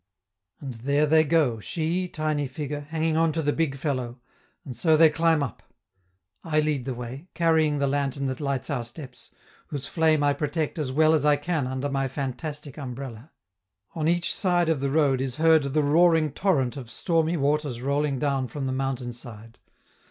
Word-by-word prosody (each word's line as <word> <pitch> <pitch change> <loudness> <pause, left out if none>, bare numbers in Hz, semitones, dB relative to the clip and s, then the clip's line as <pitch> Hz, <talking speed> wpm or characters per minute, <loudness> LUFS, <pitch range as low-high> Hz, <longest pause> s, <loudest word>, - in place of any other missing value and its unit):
And 135 -3 -6
there 140 +6 +1
they 155 +1 +5
go, 150 -7 +2
she, 170 - -2
tiny 155 -3 -2
figure, 145 +2 -5
hanging 160 0 0
on 165 0 +3
to 160 0 -1
the 145 0 +1
big 160 -4 0
fellow, 130 -4 -3 0.5
and 130 - -7
so 155 +6 +3
they 160 -1 +7
climb 160 -1 +2
up. 130 - -6 0.8
I 155 -2 +1
lead 150 -4 0
the 130 -2 -3
way, 125 +7 -7
carrying 160 -3 +2
the 140 - +1
lantern 140 0 -1
that 130 -1 -3
lights 140 -2 -2
our 130 -4 -1
steps, 125 +2 -10 0.4
whose 140 -2 -5
flame 160 -2 +2
I 145 0 +3
protect 150 +2 -2
as 140 -4 -2
well 155 +3 +4
as 155 -3 +2
I 150 0 +5
can 145 -2 -2
under 130 +2 -2
my 135 -1 -1
fantastic 140 +2 -5
umbrella. 130 0 -7 0.6
On 155 -2 -1
each 175 +1 +1
side 175 -3 +1
of 160 -4 +1
the 140 0 -1
road 140 -3 +2
is 130 -2 -3
heard 160 +1 +5
the 150 +2 +1
roaring 160 +1 +4
torrent 145 -7 0
of 125 -4 -8
stormy 165 +3 0
waters 145 -3 0
rolling 140 +2 0
down 135 -1 0
from 140 +1 -5
the 130 - -1
mountain 130 -2 -2
side. 115 -1 -10
145 Hz, 185 wpm, -26 LUFS, 130-160 Hz, 0.8 s, they